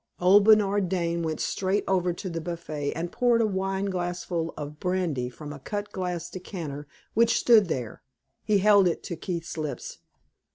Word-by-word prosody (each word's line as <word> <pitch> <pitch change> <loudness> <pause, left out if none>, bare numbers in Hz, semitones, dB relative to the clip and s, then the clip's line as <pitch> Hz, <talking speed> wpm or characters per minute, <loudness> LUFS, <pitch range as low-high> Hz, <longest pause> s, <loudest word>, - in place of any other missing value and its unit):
Old 195 +3 +6
Bernard 205 -3 +4
Dane 170 -2 -1
went 160 -2 -2
straight 195 +2 0
over 180 -2 +2
to 180 +3 -6
the 165 -2 -4
buffet 155 -4 -4
and 170 +2 -4
poured 240 -2 +3
a 230 - +3
wine 195 -1 -1
glassful 175 -3 -2
of 150 0 -7
brandy 175 -9 -1
from 145 +3 -9
a 140 - -9
cut 205 +8 -5
glass 180 -2 -3
decanter 160 -7 -7 0.3
which 230 +1 +4
stood 220 -5 +5
there. 125 -8 -4 0.4
He 210 -2 +3
held 200 -1 +5
it 170 - -2
to 170 - -5
Keith's 170 -1 -5
lips. 145 -5 -5
180 Hz, 170 wpm, -27 LUFS, 165-195 Hz, 0.4 s, Old